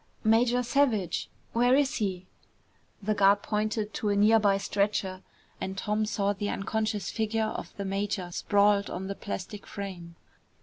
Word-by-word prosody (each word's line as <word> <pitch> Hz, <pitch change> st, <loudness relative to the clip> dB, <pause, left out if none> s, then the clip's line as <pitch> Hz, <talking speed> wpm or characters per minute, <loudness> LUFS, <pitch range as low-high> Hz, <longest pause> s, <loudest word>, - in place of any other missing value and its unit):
"Major 235 Hz, +3 st, +3 dB
Savage! 240 Hz, -, +1 dB, 0.2 s
Where 245 Hz, +2 st, +4 dB
is 280 Hz, -1 st, +2 dB
he?" 190 Hz, -4 st, -2 dB, 0.8 s
The 215 Hz, +2 st, +1 dB
guard 200 Hz, 0 st, +4 dB
pointed 215 Hz, 0 st, -1 dB
to 210 Hz, -, -1 dB
a 205 Hz, -, +2 dB
near 215 Hz, +2 st, +5 dB
by 200 Hz, -2 st, +3 dB
stretcher 195 Hz, -1 st, -1 dB, 0.4 s
and 190 Hz, 0 st, -4 dB
Tom 210 Hz, +2 st, 0 dB
saw 205 Hz, -1 st, 0 dB
the 205 Hz, +1 st, -3 dB
unconscious 215 Hz, -1 st, -2 dB
figure 220 Hz, 0 st, 0 dB
of -, -, -6 dB
the 200 Hz, -, -3 dB
major 195 Hz, -2 st, -2 dB
sprawled 205 Hz, +2 st, +2 dB
on 185 Hz, +2 st, -4 dB
the 200 Hz, -, -3 dB
plastic 200 Hz, 0 st, -6 dB
frame. 180 Hz, -4 st, -7 dB
205 Hz, 150 wpm, -28 LUFS, 195-220 Hz, 0.8 s, near